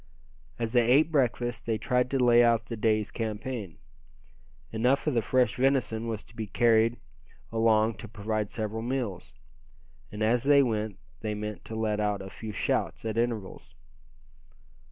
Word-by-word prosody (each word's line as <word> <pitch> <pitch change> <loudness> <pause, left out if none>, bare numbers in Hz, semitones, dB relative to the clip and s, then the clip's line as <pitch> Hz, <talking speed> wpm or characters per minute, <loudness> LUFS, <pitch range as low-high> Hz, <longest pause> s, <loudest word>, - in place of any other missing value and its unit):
As 115 -2 -2
they 120 -1 +3
ate 150 +6 +5
breakfast 120 -5 0
they 110 -1 +1
tried 125 +2 0
to 135 - 0
lay 120 -2 +5
out 115 -1 +3
the 115 - -5
day's 110 -1 +1
campaign. 110 -3 -4 0.9
Enough 125 +5 +1
of 150 - +1
the 115 - +2
fresh 125 +4 +1
venison 125 -4 +1
was 110 -2 -4
to - - -21
be 110 -1 -4
carried 115 +2 +3 0.5
along 110 -1 +2
to 115 - -8
provide 110 -1 -3
several 110 0 -3
meals. 115 - -4 0.8
And 105 +1 -3
as 115 +2 +3
they 140 0 +6
went, 110 -4 -2 0.2
they 105 -1 -3
meant 105 0 -5
to 110 - -6
let 110 -1 -1
out 105 -1 0
a 95 - -9
few 110 -1 -7
shouts 105 - -1
at 110 -1 -2
intervals. 115 -4 -3
115 Hz, 160 wpm, -28 LUFS, 110-120 Hz, 0.9 s, they